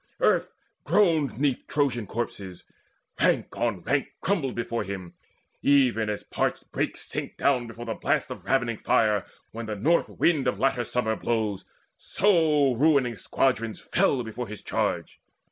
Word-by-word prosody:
Earth - - +2 0.3
groaned 160 - +2
'neath 135 -1 0
Trojan 130 -7 0
corpses; 100 -5 -5 0.6
rank - - +2
on 105 -7 -1
rank 145 +1 +1
Crumbled 165 -10 -1
before 115 0 -2
him, 95 -3 -7 0.5
even 125 -6 +3
as 105 - -3
parched - - -2
brakes - - -2
Sink - - -4
down 125 -4 +2
before 115 +1 -8
the 115 - -2
blast - - 0
of - - -7
ravening 120 -4 +1
fire 105 -3 +2 0.2
When 115 0 -6
the 105 - -3
north 155 +12 +2
wind 155 -6 +1
of 100 - 0
latter 125 -1 +1
summer 110 -2 0
blows; 110 -4 -2 0.3
So 155 -8 +3
ruining 135 -2 +3
squadrons 115 -1 0
fell 145 -9 +1
before 115 +2 -5
his 105 0 -8
charge. - - -2
120 Hz, 145 wpm, -26 LUFS, 110-140 Hz, 0.6 s, even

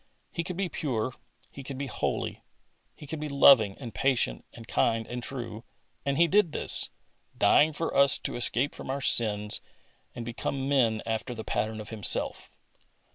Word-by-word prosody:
He 170 - -2
could 175 +1 -6
be 195 -1 0
pure, 130 -7 -2 0.4
He 140 - -9
could 135 0 -7
be 140 - -3
holy. 130 - -3 0.5
He - - -11
could 150 +2 -5
be 150 0 -4
loving 130 -8 +6
and 120 -5 -8
patient 125 - 0
and 115 -1 -12
kind 115 -1 +1
and 120 +2 -5
true, 120 -3 -6 0.4
and 140 -1 -1
He 170 - +5
did 185 -3 +3
this, - - -1 0.5
dying 155 +2 +5
for 165 +2 -3
us 140 -1 +6
to - - -4
escape 120 +3 +1
from - - -9
our 140 +1 -2
sins 105 -4 +2 0.5
and 120 - -6
become 130 +3 -3
men 120 -6 +2
after 115 +2 -3
the 110 - -6
pattern 110 0 -2
of 105 - -8
Himself. 110 -3 -1
130 Hz, 175 wpm, -28 LUFS, 115-140 Hz, 0.5 s, loving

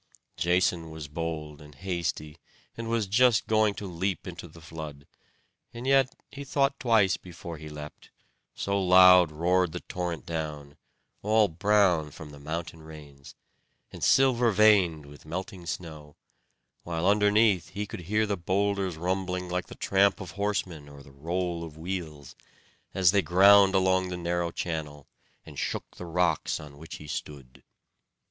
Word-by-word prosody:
Jason 90 -1 +1
was 80 -2 -8
bold 75 -1 -5
and 75 -1 -14
hasty, 85 -3 -4 0.4
and 115 0 -6
was 115 -2 0
just 115 +3 +3
going 110 -2 +2
to 105 - -7
leap 95 +1 -3
into 85 -1 -8
the 80 +1 -15
flood; 80 -3 -9 0.7
and 120 +2 -7
yet 135 -1 +3 0.2
he 140 - -8
thought 140 0 0
twice 110 -8 +3
before 85 -2 -9
he 75 0 -9
leapt, 75 0 -10 0.5
so 100 0 -1
loud 90 -2 +7
roared 90 +2 +1
the - - -4
torrent 90 -3 -5
down, 75 -3 -5 0.5
all 110 +1 +3
brown 95 -3 +2
from 75 +1 -11
the 70 - -12
mountain 80 +2 -6
rains, 75 -3 -13 0.6
and - - -9
silver 125 -3 +4
veined 95 -7 +4
with 75 +1 -14
melting 90 +2 -7
snow; 75 -4 -7 0.7
while 85 0 -3
underneath 105 -3 +3
he 105 +1 -4
could - - -8
hear 105 +5 0
the 105 -1 -1
boulders 95 0 -1
rumbling 90 +1 -2
like 90 +1 -2
the - - -11
tramp 100 +1 +2
of 90 -3 -8
horsemen 95 -7 -3
or 70 -1 -13
the 70 - -16
roll 85 +4 -3
of 80 -2 -10
wheels, 80 -5 -6 0.6
as 95 -3 +5
they 100 0 +3
ground 95 +3 +6
along 95 0 +2
the 90 - -4
narrow 85 0 -1
channel, 75 -4 -5 0.4
and - - -9
shook - - -4
the 90 - -8
rocks 85 -1 0
on 75 -2 -12
which 80 - -9
he 75 - -11
stood. 70 -3 -8
90 Hz, 155 wpm, -27 LUFS, 80-100 Hz, 0.7 s, loud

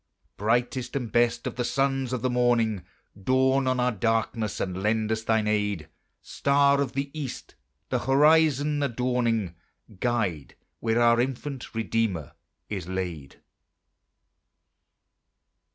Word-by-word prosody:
Brightest 120 +5 -1
and 125 -5 -3
best 120 +1 +2
of - - -4
the 125 - 0
sons 135 0 0
of 125 -2 -3
the 130 - +2
morning, 120 -5 +2 0.3
Dawn 130 +6 +2
on 130 0 +1
our 125 0 +2
darkness, 115 -1 -1
and 95 0 -3
lend 110 +1 0
us 110 0 0
thine 110 -1 +1
aid: 105 -7 -1 0.3
Star 140 0 +2
of 135 -3 -2
the 140 +1 -3
East, 150 -5 -6 0.4
the - - 0
horizon 150 +1 +3
adorning, 120 -7 0 0.5
Guide 105 - -1 0.2
where 115 +1 +1
our 120 0 +5
infant 135 0 -4
Redeemer 110 -8 -1 0.4
is 95 -5 -5
laid. 90 -7 -5
120 Hz, 120 wpm, -26 LUFS, 105-130 Hz, 0.5 s, our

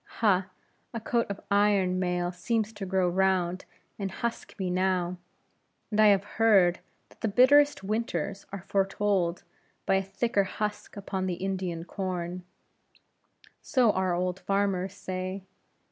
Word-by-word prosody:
Ha! 190 -4 +3 0.5
a - - -1
coat 235 +1 0
of 200 - -4
iron 200 -3 +3
mail 180 -1 0
seems 220 +4 -1
to 205 -2 -6
grow 185 -1 +2
round, 185 0 +1 0.3
and 195 -1 -2
husk 230 +4 -5
me 185 -3 -2
now; 180 -1 0 0.7
and 210 - 0
I 215 - +7
have 200 -1 +5 0.2
heard, 195 -6 +5 0.3
that - - -22
the - - +1
bitterest 285 +5 +5
winters 200 -3 -2
are 195 -2 -6
foretold 195 -3 0 0.4
by 195 - +3
a - - +1
thicker 200 +2 0
husk 210 +2 -4
upon 190 -1 -3
the 180 - -1
Indian 185 -2 -3
corn; 180 -2 -4 1.2
so 245 -5 +3
our 185 -2 0
old 180 +1 -1
farmers 195 -1 0
say. 185 0 -5
190 Hz, 140 wpm, -28 LUFS, 185-205 Hz, 1.2 s, I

